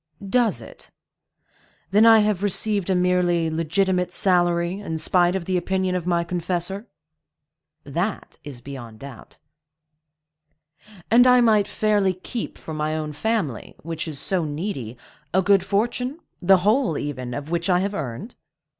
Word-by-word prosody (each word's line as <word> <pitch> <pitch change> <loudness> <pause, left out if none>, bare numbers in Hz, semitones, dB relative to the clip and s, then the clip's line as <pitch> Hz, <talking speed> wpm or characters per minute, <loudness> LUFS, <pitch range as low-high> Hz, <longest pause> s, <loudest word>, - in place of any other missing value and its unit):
"Does 240 -3 +2
it? - - -14 1.0
Then 210 +3 +5
I 225 -1 +7
have 210 -3 0
received 205 -1 0
a 190 - +2
merely 180 -2 +1
legitimate 180 +3 0
salary, 175 0 +2
in 165 -6 -4
spite 175 +2 +2
of 185 -3 -3
the 185 0 0
opinion 185 +1 -1
of 180 -1 -3
my 170 -1 +1
confessor?" 180 +4 -3 1.0
"That 175 +9 -4
is 140 -5 -9
beyond 120 -5 -9
doubt." 135 -1 -12 1.7
"And 245 +2 +6
I 250 0 +6
might 215 -4 +3
fairly 205 -3 +1
keep 220 +5 -6
for 160 - -8
my 155 0 -2
own 155 -1 -4
family, 190 - -2
which 165 0 -5
is 155 -3 -2
so 185 +4 0
needy, 145 - -5 0.4
a 190 - +4
good 195 -1 +4
fortune,—the 210 - 0
whole, 210 - +1
even, 130 -4 -5
of 145 +3 -6
which 170 +1 -1
I 180 - +4
have 200 +1 -2
earned?" 140 - -5
180 Hz, 145 wpm, -23 LUFS, 160-205 Hz, 1.7 s, I